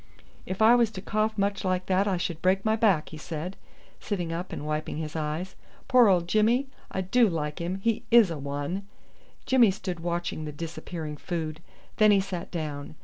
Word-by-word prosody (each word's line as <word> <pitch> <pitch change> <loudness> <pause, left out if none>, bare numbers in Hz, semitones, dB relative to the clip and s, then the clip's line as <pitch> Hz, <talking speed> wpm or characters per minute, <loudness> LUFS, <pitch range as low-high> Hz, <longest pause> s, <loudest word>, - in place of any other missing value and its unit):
"If 190 +3 0
I 225 +2 +8
was 240 -2 +4
to - - -6
cough 215 0 0
much 200 0 0
like 185 -1 0
that 190 +2 +2
I 190 -3 +1
should 170 -2 -3
break 190 +2 +2
my 220 0 +3
back," 200 -9 +2
he 155 - -9
said, 165 +4 -5 0.4
sitting 175 -5 -3
up 175 +3 -4
and 145 - -5
wiping 155 0 -3
his 155 0 -5
eyes. 160 +4 -3 0.3
"Poor 255 -3 +6
old 175 -3 +3
Jimmy? 225 +7 +3 0.2
I 190 - -2
do 220 +5 +3
like 150 -3 -3
him. 175 +2 -2
He 230 +1 +1
is 230 -6 +6
a 160 - -4
one." 145 +8 -4 0.6
Jimmy 250 -4 +5
stood 185 -3 -4
watching 170 -2 -3
the 150 - -5
disappearing 160 0 -6
food, 160 -1 -4 0.4
then 215 -1 +6
he 205 -1 +6
sat 190 -3 -4
down. 150 -3 -5
180 Hz, 195 wpm, -27 LUFS, 160-205 Hz, 0.6 s, I